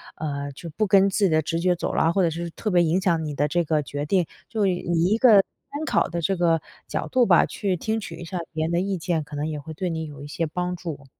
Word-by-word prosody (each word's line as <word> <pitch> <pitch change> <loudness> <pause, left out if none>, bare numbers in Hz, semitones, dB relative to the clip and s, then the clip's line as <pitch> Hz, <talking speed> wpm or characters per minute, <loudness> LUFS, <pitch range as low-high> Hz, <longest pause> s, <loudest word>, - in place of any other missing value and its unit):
呃， 140 -2 -4
就 165 +4 -8
不 215 +6 0
跟 195 0 +5
自 200 +1 +2
己 - - +3
的 155 -1 +3
直 165 +2 -1
觉 180 0 +2
走 175 - -3
了， 165 - +3
或 190 0 +2
者 170 - +3
是 170 +1 -4
特 215 - -3
别 175 -1 +5
影 170 +3 +2
响 170 -4 +1
你 150 - -4
的 145 +1 +1
这 175 +3 +1
个 155 -1 +1
决 145 +2 -4
定， 185 -1 +2 0.2
就 215 -3 0
以 180 - +1 0.3
一 215 +4 +3
个 230 -4 +7 0.4
参 295 +2 -4
考 - - +2
的 170 0 -3
这 195 +4 +1
个 165 -2 +2 0.3
角 - - -3
度 255 -2 +3
吧， - - +6
去 195 -3 -2
听 220 +5 -1
取 - - -7
一 175 - -8
下 175 +2 -4
别 155 0 -1
人 165 - -2
的 170 - +2
意 195 0 -1
见， 165 -2 -1
可 150 0 -10
能 150 +2 -2
也 150 -2 -4
会 155 +3 -8
对 180 +3 -3
你 160 -1 -3
有 145 -1 -10
一 - - -7
些 165 +3 -2
帮 180 +2 -2
助。 160 -6 -7
170 Hz, 305 characters per minute, -24 LUFS, 155-190 Hz, 0.4 s, 个